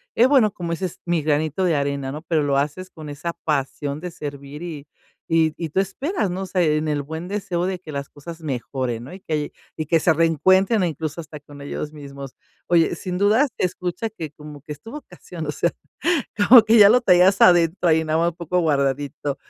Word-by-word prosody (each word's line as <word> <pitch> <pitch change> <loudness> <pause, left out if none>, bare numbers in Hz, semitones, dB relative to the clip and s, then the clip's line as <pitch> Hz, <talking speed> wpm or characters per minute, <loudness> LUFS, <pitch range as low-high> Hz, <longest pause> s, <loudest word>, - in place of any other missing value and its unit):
el 240 - +5
bueno, 260 -7 +4
como 170 -3 -4
ese 185 +3 -3
es 180 - -7
mi 175 -2 +1
granito 155 +3 0
de 175 -3 +2
arena, 140 -1 -2
¿no? 150 +2 -6
Pero 160 -3 +1
lo 140 -1 +1
haces 150 +7 -2
con 155 -2 -10
esa 145 +4 -5
pasión 145 -1 -2
de 180 +2 -6
servir 145 -1 -8
y 160 -5 -7 0.5
y 160 -1 +3
y 165 -2 -4
tú 170 - 0
esperas, 205 - -1
¿no? 185 +2 -4
O - - -3
sea, 180 0 +1
en 155 -1 +1
el 145 -1 -1
buen 160 +4 -6
deseo 185 -3 -2
de 190 -1 -2
que 165 -4 -10
las 140 -1 -5
cosas 165 +3 -10
mejoren, 130 -4 -3
¿no? 130 - -10
Y 190 - -9
que 155 -5 -3 0.3
y 155 - -2
que 165 +2 +3
se 160 - +3
reencuentren, 185 - +3
incluso 160 -1 -3
hasta 155 -1 -10
con 145 0 -14
ellos 150 +1 -5
mismos. 140 -2 -9 0.3
Oye, 170 -1 +3
sin 180 +1 -4
dudas, 220 +8 +4
te - - -3
escuchas 180 +5 -4
que 155 -3 -5
como 150 -1 -12
que 150 - -11
es 150 0 -8
tu 225 - -11
vocación, 180 - -9
o 150 - -2
sea, 170 - 0 0.8
como 245 -1 +10
que 225 +1 +4
ya 205 -1 +9
lo 245 +4 +5
traías 190 -2 +4
adentro 175 0 +5
ahí, 160 0 +3
nada 155 +1 0
más 170 +1 +2
un 165 - -17
poco 175 +1 -1
guardadito, 140 -2 -1
160 Hz, 220 wpm, -22 LUFS, 145-180 Hz, 0.8 s, como